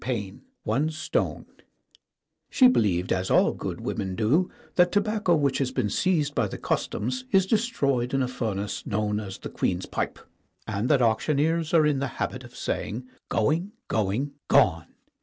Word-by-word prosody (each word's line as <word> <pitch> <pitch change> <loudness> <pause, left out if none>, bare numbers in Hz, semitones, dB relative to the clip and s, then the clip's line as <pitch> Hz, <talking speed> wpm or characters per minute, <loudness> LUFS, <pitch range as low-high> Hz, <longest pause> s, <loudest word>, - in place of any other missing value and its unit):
VII 105 -7 -3 0.2
ONE 135 +8 +1
STONE 155 +1 -2 1.0
SHE 255 -3 +6
believed, 95 - +1
as 95 0 -1
all - - +4
good - - -5
women 95 -1 -3
do, 130 - +2 0.2
that 180 0 +4
tobacco 205 -3 +2
which 140 -3 +1
has 135 -2 +1
been 105 -5 -1
seized 155 - +1
by 115 -6 +1
the' - - -6
Customs 125 +4 -2
is 190 -1 +4
de 205 - +2
stroyed 140 - 0
in 135 -1 +1
a - - 0
furnace 105 -5 -3
known 105 0 0
as 95 -3 -6
the - - -7
Queen's 90 +1 -1
Pipe, - - -3 0.5
and 110 +2 -2
that 140 -4 +4
auctioneers 155 +8 +1
are 160 -3 +5
in 145 -3 +2
the 140 - -1
habit - - -3
of - - -13
saying 125 +4 -3 0.2
"Going, 165 - 0 0.2
going, 110 +7 0 0.2
gone 80 -1 +4
130 Hz, 165 wpm, -26 LUFS, 105-160 Hz, 1.0 s, SHE